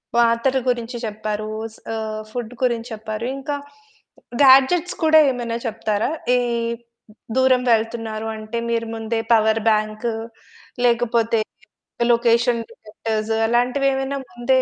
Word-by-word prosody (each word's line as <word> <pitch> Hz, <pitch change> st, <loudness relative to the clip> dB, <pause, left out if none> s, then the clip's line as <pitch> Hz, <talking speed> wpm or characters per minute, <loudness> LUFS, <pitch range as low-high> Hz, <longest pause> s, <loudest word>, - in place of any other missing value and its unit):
పాత్రల 235 Hz, +3 st, +3 dB
గురించి 240 Hz, 0 st, -2 dB
చెప్పారు. 215 Hz, 0 st, -4 dB, 0.2 s
స్ -, -, -17 dB, 0.2 s
ఆహ్, 215 Hz, -1 st, -4 dB
ఫుడ్ 245 Hz, 0 st, -5 dB
గురించి 235 Hz, -1 st, 0 dB
చెప్పారు. 220 Hz, +1 st, -5 dB
ఇంకా 285 Hz, +2 st, -3 dB, 0.9 s
గాడ్జెట్స్ 270 Hz, +7 st, +5 dB
కూడా 315 Hz, 0 st, +7 dB
ఏమైనా 235 Hz, -2 st, -3 dB
చెప్తారా? 220 Hz, 0 st, -1 dB, 0.3 s
ఈ -, -, +3 dB, 1.0 s
దూరం 260 Hz, -1 st, +4 dB
వెళ్తున్నారు 225 Hz, -1 st, -2 dB
అంటే 215 Hz, +2 st, -6 dB
మీరు 230 Hz, -1 st, -1 dB
ముందే 225 Hz, 0 st, -2 dB
పవర్‌బాంకు 220 Hz, 0 st, +2 dB, 0.7 s
లేకపోతే 230 Hz, -1 st, +2 dB, 0.7 s
లొకేషన్ 235 Hz, 0 st, +2 dB
డిటెక్టర్స్ 220 Hz, 0 st, -4 dB
అలాంటివి 245 Hz, +4 st, +2 dB
ఏమైనా 270 Hz, +1 st, -2 dB
ముందే 255 Hz, +2 st, +1 dB
230 Hz, 105 wpm, -21 LUFS, 220-245 Hz, 1.0 s, కూడా